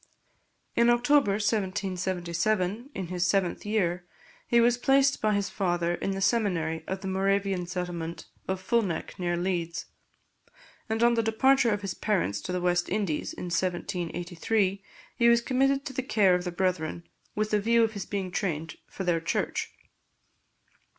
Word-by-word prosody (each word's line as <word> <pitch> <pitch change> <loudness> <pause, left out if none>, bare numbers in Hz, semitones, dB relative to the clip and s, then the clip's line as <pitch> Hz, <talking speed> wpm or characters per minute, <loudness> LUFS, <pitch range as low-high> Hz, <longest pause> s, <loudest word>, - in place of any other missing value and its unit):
In 235 0 +4
October 240 -2 +4
1777, 190 - -1
in 190 -2 -4
his 180 0 0
seventh 190 +1 0
year, 180 -4 0 0.4
he 235 - +4
was 240 +1 +3
placed 270 +1 +3
by 215 -1 +2
his 200 0 -1
father 175 -3 0
in 175 - -3
the 195 0 -2
seminary 180 -7 +1
of 190 0 -3
the 195 - -5
Moravian 195 -1 0
settlement 175 -2 -4 0.2
of 190 0 -1
Fulneck, 190 -3 -1
near 175 -1 0
Leeds; 175 -2 -2 1.0
and 225 +1 0
on 240 0 +5
the 230 - +2
departure 240 +3 +3
of 205 -1 -1
his 195 -2 -2
parents 175 - -1
to - - -5
the 180 - -1
West 175 0 +1
Indies, 195 -7 -1
in - - -8
1783, 180 +3 -1 0.3
he 235 0 +5
was 235 0 +6
committed 270 +3 +1
to 270 - -5
the 260 - -1
care 210 -7 +3
of 180 0 0
the 180 - -2
Brethren, 175 -2 -2 0.3
with 215 0 -1
the 210 -1 +2
view 230 +2 +4
of 225 - +1
his 200 - -6
being 195 -3 -3
trained 165 -5 -3
for 190 - -6
their 175 -2 +1
Church. 165 - -2
190 Hz, 160 wpm, -28 LUFS, 175-220 Hz, 1.0 s, was